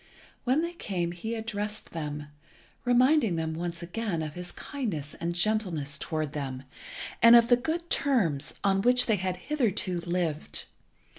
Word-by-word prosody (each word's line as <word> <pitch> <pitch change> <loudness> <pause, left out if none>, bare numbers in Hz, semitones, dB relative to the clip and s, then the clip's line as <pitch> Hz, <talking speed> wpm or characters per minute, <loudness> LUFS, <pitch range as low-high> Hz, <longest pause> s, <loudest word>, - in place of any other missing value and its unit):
When 265 +6 +3
they 340 +1 -3
came 180 - -2
he 220 +7 -4
addressed 210 -1 -4
them, 150 -2 -5 0.6
reminding 245 - +4
them 160 -1 -2
once 170 +1 -4
again 175 -2 -2
of 155 -1 -5
his 180 +1 -6
kindness 195 - -4
and 170 0 -1
gentleness 175 -8 0
towards 155 -3 -2
them, 135 -3 -4 0.6
and 230 0 +9
of 235 0 +6
the 245 - +8
good 320 +7 -3
terms 185 - +1
on 195 -1 +3
which 250 +3 +6
they 220 -3 +2
had 185 -1 -2
hitherto 205 -8 -1
lived. 170 -3 -1
185 Hz, 150 wpm, -28 LUFS, 160-235 Hz, 0.6 s, and